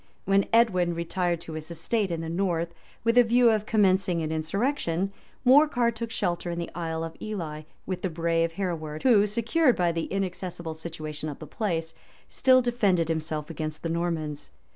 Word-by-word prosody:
While 195 Hz, +1 st, +3 dB
Edwin 185 Hz, -7 st, +3 dB
retired 170 Hz, 0 st, -1 dB
to 165 Hz, -, -8 dB
his 155 Hz, 0 st, -6 dB
estate 190 Hz, +5 st, -1 dB
in 165 Hz, -1 st, -2 dB
the 165 Hz, -, -5 dB
north, 170 Hz, -1 st, -1 dB, 0.3 s
with 230 Hz, +2 st, +4 dB
a -, -, +8 dB
view 240 Hz, 0 st, +5 dB
of 215 Hz, -1 st, 0 dB
commencing 190 Hz, -5 st, +2 dB
an 155 Hz, -, -2 dB
insurrection, 195 Hz, -, -1 dB, 0.3 s
Morcar 255 Hz, -3 st, +5 dB
took 230 Hz, +1 st, -5 dB
shelter 175 Hz, -5 st, -2 dB
in 170 Hz, -, -3 dB
the 170 Hz, -, -4 dB
Isle 165 Hz, -1 st, -3 dB
of 165 Hz, 0 st, -6 dB
Ely, 165 Hz, -8 st, -4 dB, 0.2 s
with 185 Hz, -1 st, -4 dB
the 185 Hz, -, -1 dB
brave 165 Hz, 0 st, 0 dB
Hereward, 160 Hz, -5 st, -4 dB
who, 215 Hz, -5 st, +5 dB
secured 235 Hz, +6 st, +2 dB
by 175 Hz, -1 st, +2 dB
the 165 Hz, -1 st, -2 dB
inaccessible 180 Hz, -3 st, -3 dB
situation 155 Hz, -1 st, -6 dB
of 145 Hz, -, -6 dB
the -, -, -9 dB
place, 165 Hz, -7 st, -2 dB, 0.3 s
still 255 Hz, -1 st, +4 dB
defended 200 Hz, -9 st, +2 dB
himself 155 Hz, -1 st, -2 dB
against 155 Hz, 0 st, -5 dB
the 165 Hz, -, -1 dB
Normans. 165 Hz, -3 st, -2 dB
175 Hz, 175 wpm, -27 LUFS, 165-210 Hz, 0.3 s, a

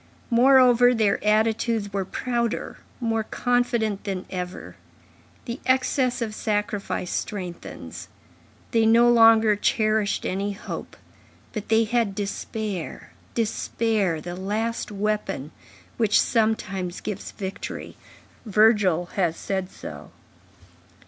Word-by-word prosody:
Moreover, 250 Hz, 0 st, +6 dB
their 215 Hz, -3 st, +1 dB
attitudes 215 Hz, 0 st, +1 dB
were 195 Hz, -1 st, -1 dB
prouder, 235 Hz, +2 st, -2 dB, 0.2 s
more 225 Hz, -2 st, 0 dB
confident 235 Hz, -3 st, 0 dB
than 190 Hz, -3 st, -4 dB
ever; 180 Hz, -1 st, -6 dB, 0.7 s
the 235 Hz, 0 st, -5 dB
excess 255 Hz, -1 st, +2 dB
of 215 Hz, -2 st, -4 dB
sacrifice 210 Hz, -4 st, -2 dB
strengthens; 180 Hz, -5 st, -6 dB, 0.6 s
they 230 Hz, -3 st, +3 dB
no 235 Hz, +2 st, +6 dB
longer 225 Hz, -2 st, +6 dB
cherished 215 Hz, 0 st, +1 dB
any 200 Hz, +2 st, -1 dB
hope, 200 Hz, -, -7 dB, 0.6 s
but 215 Hz, -3 st, -5 dB
they 225 Hz, 0 st, +4 dB
had 225 Hz, -3 st, 0 dB
despair, 205 Hz, -2 st, -4 dB, 0.2 s
despair,—the 210 Hz, -6 st, -1 dB
last 215 Hz, +5 st, -2 dB
weapon, 210 Hz, -8 st, -2 dB, 0.5 s
which 220 Hz, -3 st, +4 dB
sometimes 195 Hz, -5 st, 0 dB
gives 205 Hz, -2 st, -5 dB
victory; 190 Hz, -1 st, -6 dB, 0.5 s
Virgil 210 Hz, -5 st, +3 dB
has 170 Hz, -4 st, +1 dB
said 190 Hz, -2 st, -3 dB
so. -, -, -9 dB
215 Hz, 100 wpm, -24 LUFS, 195-230 Hz, 0.7 s, Moreover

